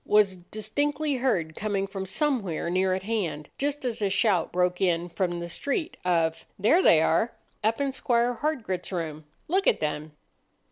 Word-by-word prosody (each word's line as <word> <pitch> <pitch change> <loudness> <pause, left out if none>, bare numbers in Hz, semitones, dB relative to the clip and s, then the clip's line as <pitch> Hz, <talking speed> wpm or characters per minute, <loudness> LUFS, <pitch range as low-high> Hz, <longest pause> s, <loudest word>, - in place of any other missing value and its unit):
was 210 -2 +4
distinctly 275 - -2
heard 175 -12 0
coming 200 -2 -1
from 195 -1 -5
somewhere 200 - 0
near 185 +1 +2
at 190 - -4
hand, 190 -8 -2
just 290 0 -1
as 235 -2 -2
a 200 - +2
shout 190 -4 +2
broke 180 0 +1
in 175 -2 +2
from 175 0 -2
the 170 - -4
street 285 - -2
of,— 165 -2 +1
"There 225 - +4
they 160 - +6
are—up 220 - 0
in 280 -1 0
Squire 240 -1 +1
Hardgrit's 225 - -2
room! 160 -4 -4 0.2
Look 380 +4 +1
at - - +4
them!" 150 0 -3
195 Hz, 160 wpm, -27 LUFS, 175-245 Hz, 0.2 s, they